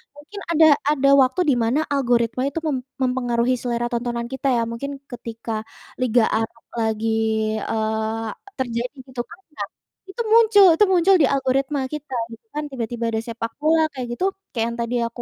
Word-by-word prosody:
mungkin 305 +8 -10
ada 320 -1 +6 0.2
ada 275 -2 +3
waktu 260 +8 +2
di 265 - +4
mana 235 +6 +2
algoritma 245 -2 +1
itu 305 - -3
mem 285 -3 0 0.2
mempengaruhi 250 -1 +1
selera 240 -1 -1
tontonan 235 0 -2
kita, 265 +1 -2
ya. 230 - +1
Mungkin, 275 +5 -4 0.2
ketika 230 -2 -5 0.4
Liga 240 -2 +3
Arab 225 +1 -2 0.2
lagi, 220 0 0 0.5
eee, 220 0 -2 0.3
terjadi, 245 +1 -2
gitu, 255 -2 -4
kan, 335 - -14 0.2
nah, - - -3 0.5
itu 475 - -3
muncul 440 -3 +7
itu 420 - +6
muncul 370 +2 +5
di - - +5
algoritma 270 +1 +1
kita, 300 -2 -6 0.2
gitu, - - -30
kan. 300 - -1
Tiba-tiba 235 -2 -3
ada 220 - 0
sepak 230 0 -5
bola, 315 +1 +4
kayak 255 -2 -4
gitu, 370 - +1 0.3
kayak 230 -3 0
yang - - -8
tadi 235 +1 -2
aku 230 +1 -8
245 Hz, 170 wpm, -22 LUFS, 230-280 Hz, 0.5 s, muncul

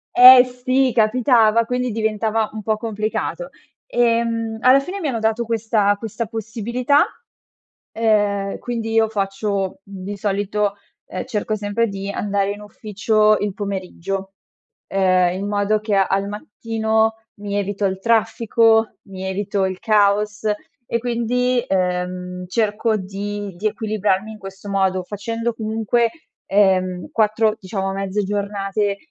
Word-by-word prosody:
Eh 250 0 +10
sì 255 +1 0
capitava, 230 0 +4
quindi 250 +1 -1
diventava 220 0 0
un 215 -1 -6
po' 215 +1 0
complicato. 220 - -3 0.4
Ehm, 230 - 0
alla 260 +2 +6
fine 365 +8 -5
mi 320 - -2
hanno 240 -5 -1
dato 220 +1 0
questa 220 -2 +1
questa 225 +2 -4
possibilità, 230 +5 0 0.9
ehm, 205 -3 +1
quindi 230 -2 -4
io 225 0 +4
faccio 195 -2 -2
di 200 +1 -7
solito, 205 0 -1 0.3
ehm, 185 - -5
cerco 215 -3 -2
sempre 210 +3 -1
di 195 0 -5
andare 200 -1 -1
in 205 +1 -7
ufficio 215 +1 +1
il 205 -1 -2
pomeriggio, 195 -1 -4 0.5
ehm, 185 -2 +2
in 200 - -3
modo 205 +1 +1
che 215 -1 -1
al 195 0 +1
mattino 220 +1 -1 0.2
mi 205 0 -5
evito 205 0 -1
il 190 0 -1
traffico, 225 0 +2
mi 190 -2 -9
evito 195 +1 -1
il 185 -1 -3
caos 210 0 +2 0.4
e 235 - 0
quindi, 245 +1 0
ehm, 180 0 -2
cerco 215 +2 0
di 200 0 -5
di 210 +5 -1
equilibrarmi 210 -1 -1
in 215 - -11
questo 195 0 -9
modo 190 -2 +1
facendo 230 +4 -3
comunque, 225 +1 0 0.4
ehm, 185 -3 +2
4, 215 0 +2
diciamo, 195 0 -3
mezze 195 +1 -2
giornate 200 0 -1
210 Hz, 130 wpm, -20 LUFS, 195-225 Hz, 0.9 s, Eh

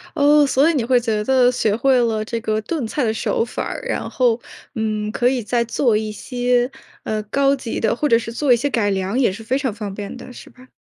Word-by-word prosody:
哦， 290 0 +5
所 275 +3 +3
以 - - +2
你 270 -6 0
会 245 +1 +3
觉 220 -3 -1
得 255 +1 +4
学 220 -4 0
会 260 +3 +3
了 225 -2 0
这 230 +1 -4
个 215 0 -1
炖 270 +4 -3
菜 280 +3 -2
的 220 - +1
手 225 - 0
法 240 - -4
儿， - - -5
然 - - -2
后， 245 -2 +1 0.4
嗯， 215 -1 -2
可 245 +2 +1
以 255 -3 -1
再 235 +2 0
做 235 0 +1
一 215 0 -3
些， 245 +2 0 0.3
呃， 215 0 -2
高 275 +6 +2
级 255 -4 -5
的 225 0 +1
或 295 - 0
者 230 - +5
是 230 0 -5
做 270 +3 0
一 - - +6
些 285 +5 -1
改 225 -6 +1
良 195 +5 -1
也 245 -8 +3
是 220 +4 -9
非 255 +4 0
常 265 -5 -2
方 205 -2 -6
便 205 +3 -7
的， 250 +1 -11
是 - - -12
吧？ 255 0 -18
235 Hz, 265 characters per minute, -20 LUFS, 220-260 Hz, 0.4 s, 一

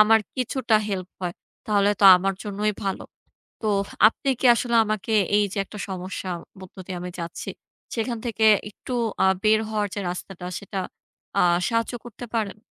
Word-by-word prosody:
আমার 220 +1 +7 0.2
কিছুটা 255 -2 +1
হেল্প 185 -2 -3
হয়, 180 -1 -3 0.3
তাহলে 205 -1 +3
তো - - +4
আমার 195 +1 0
জন্যই 210 +1 -1
ভালো। 195 - -2 0.6
তো - - -2 0.4
আপনি 270 - -6
কি - - -4
আসলে 235 0 -1
আমাকে 215 +1 -2 0.2
এইযে 205 -1 +1
একটা 210 - -10
সমস্যা 185 0 -5 0.3
মধ্য 185 +1 -13
দিয়ে 185 - -5
আমি 180 0 -5
যাচ্ছি, 170 - -6 0.5
সেখান 235 0 -2
থেকে 220 -1 0 0.3
একটু 250 - -9 0.3
আ - - +5 0.2
বের 215 0 +5
হওয়ার 210 -1 -1
যে 205 - -3
রাস্তাটা 180 0 -7
সেটা 200 -1 -5 0.6
আ - - +5 0.3
সাহায্য 230 +1 0
করতে 240 +1 -9
পারেন। 215 -3 -1
210 Hz, 160 wpm, -24 LUFS, 190-225 Hz, 0.6 s, আমার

